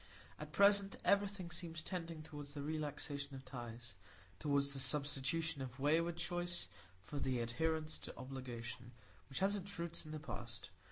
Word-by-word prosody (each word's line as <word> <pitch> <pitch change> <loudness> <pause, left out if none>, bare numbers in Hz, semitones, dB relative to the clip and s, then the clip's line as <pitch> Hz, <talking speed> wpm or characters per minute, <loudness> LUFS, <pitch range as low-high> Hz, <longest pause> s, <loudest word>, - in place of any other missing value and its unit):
At - - -6
present 200 0 +6
everything 200 -3 +3
seems 165 -3 -3
tending 165 -3 -3
toward 145 -2 -6
the 145 0 -5
relaxation 145 -2 -2
of 135 0 -8
ties,—toward 115 - -2
the 140 -1 +2
substitution 145 +2 +2
of 130 0 -5
wayward 165 +4 +3
choice 175 0 0 0.4
for 145 +8 -4
the 130 -2 +1
adherence 155 +6 +1
to - - -7
obligation, 125 -2 -5 0.4
which 135 - 0
has 200 +2 +5
its 200 0 -1
roots 170 0 -2
in 155 - -9
the 155 - -3
past. 115 -9 -6
145 Hz, 150 wpm, -40 LUFS, 130-170 Hz, 0.4 s, present